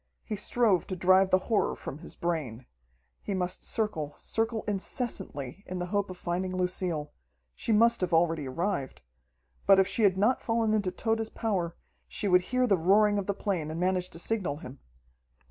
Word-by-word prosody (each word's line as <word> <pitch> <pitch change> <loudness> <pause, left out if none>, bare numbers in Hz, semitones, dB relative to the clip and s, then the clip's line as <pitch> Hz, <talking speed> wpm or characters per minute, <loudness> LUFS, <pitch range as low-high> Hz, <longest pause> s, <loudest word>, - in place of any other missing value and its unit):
He 215 - -3
strove 210 -3 +1
to 185 - -3
drive 185 +1 +4
the 185 - +5
horror 220 - +1
from 140 - -7
his - - -10
brain. 145 -9 -3 0.6
He 200 - -3
must 180 0 -2
circle, 165 -10 -2
circle 225 0 -1
incessantly, 195 - -3
in 185 - -4
the 180 - -2
hope 205 -1 +1
of 185 - -7
finding 185 +1 -2
Lucille. 180 -4 -2 0.4
She 230 - -2
must 230 +1 +4
have 180 -1 0
already 165 -3 +2
arrived. 140 - -3 0.6
But 195 - +8
if 190 0 +4
she 200 +4 -2
had 195 -3 +4
not 215 +6 +2
fallen 225 -1 +1
into 205 -3 +1
Tode's 225 +3 -1
power, 185 -7 -2 0.3
she 205 - -3
would 180 -1 +5
hear 255 0 +2
the 200 -7 +2
roaring 205 +4 +4
of 195 - -4
the 200 - 0
plane 185 -7 -2
and 160 +1 -4
manage 180 0 0
to - - -7
signal 185 -5 -1
him. 135 -4 -10
185 Hz, 180 wpm, -29 LUFS, 170-210 Hz, 0.6 s, But